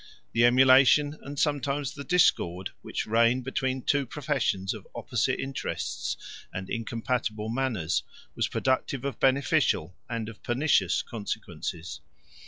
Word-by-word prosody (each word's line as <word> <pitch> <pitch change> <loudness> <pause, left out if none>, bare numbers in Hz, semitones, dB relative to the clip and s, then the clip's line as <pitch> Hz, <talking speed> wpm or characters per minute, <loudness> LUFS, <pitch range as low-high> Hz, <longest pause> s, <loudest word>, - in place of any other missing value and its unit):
The 115 +1 +4
emulation, 130 +4 +6
and 145 +1 -8
sometimes 145 -2 0
the 140 - -7
discord, 95 - +2
which - - -3
reigned 115 +3 +3
between 130 0 -2
two 140 -2 +1
professions 130 -10 -1
of - - -10
opposite - - 0
interests 135 -1 -3 0.3
and 95 +1 -6
incompatible 115 -1 -2
manners, 115 -9 0 0.3
was - - 0
productive 130 0 -1
of 140 - -3
beneficial 130 - +2
and 115 -2 -3
of 110 -1 -10
pernicious 120 - +2
consequences. 90 -6 -5
125 Hz, 120 wpm, -28 LUFS, 110-135 Hz, 0.3 s, emulation